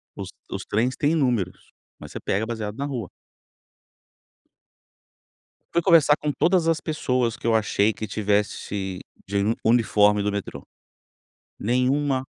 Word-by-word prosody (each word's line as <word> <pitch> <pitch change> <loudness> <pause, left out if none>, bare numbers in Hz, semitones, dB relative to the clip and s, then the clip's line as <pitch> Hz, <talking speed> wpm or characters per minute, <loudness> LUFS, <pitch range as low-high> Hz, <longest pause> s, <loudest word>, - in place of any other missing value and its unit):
Os - - -6 0.2
os - - -4
trens 120 +5 0
têm 150 +2 +1
números, 120 - -1 0.3
mas - - -10
você - - -6
pega 100 +3 -1
baseado 110 -3 -4
na 140 - -3
rua. 125 -9 -4 2.6
Fui 170 - +3
conversar 160 -4 +5
com 150 - -2
todas 170 +2 +2
as 165 -1 +2
pessoas 125 -7 -1
que - - -6
eu 115 - +3
achei 105 -1 +2
que 110 - -5
tivesse 100 -2 -2 0.3
de 100 +1 -2
uni 105 +3 +1
uniforme 105 -3 +4
do 105 0 0
metrô. 100 -1 -5 1.0
Nenhuma 130 +3 +1
115 Hz, 135 wpm, -24 LUFS, 105-140 Hz, 2.6 s, conversar